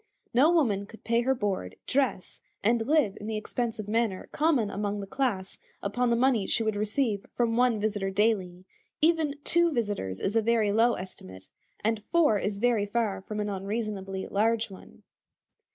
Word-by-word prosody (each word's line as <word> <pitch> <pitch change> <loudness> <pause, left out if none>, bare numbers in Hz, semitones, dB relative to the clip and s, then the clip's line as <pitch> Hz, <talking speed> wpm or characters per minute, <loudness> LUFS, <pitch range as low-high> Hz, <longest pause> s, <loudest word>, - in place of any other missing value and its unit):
No 265 +7 +5
woman 215 - +2
could 220 - -14
pay 230 +1 +2
her 265 +2 +1
board, 195 - -2
dress, 260 -9 -1 0.2
and 225 +2 +2
live 290 -10 +3
in 210 - -6
the 220 -1 -2
expensive 220 -1 -3
manner 215 -3 -1
common 285 -9 +2
among 205 0 -2
the 200 - -5
class 195 -4 -2 0.2
upon 240 +5 0
the 235 - +3
money 240 -4 +2
she 225 - +1
would 220 -1 0
receive 210 0 0
from 235 -2 +1
one 245 -2 +3
visitor 205 -2 -1
daily; 190 -3 0 0.3
even 315 -2 +2
two 340 0 +3
visitors 205 - -2
is 200 - -2
a 225 - +4
very 220 -2 +2
low 230 +3 +3
estimate, 95 - -10 0.3
and 220 0 0
four 310 -12 +4
is 200 +1 -2
very 225 -2 +2
far 205 -3 -1
from 210 +2 -6
an 210 0 -1
unreasonably 195 -1 -3
large 220 +1 +1
one. 190 - -14
215 Hz, 170 wpm, -28 LUFS, 200-240 Hz, 0.3 s, No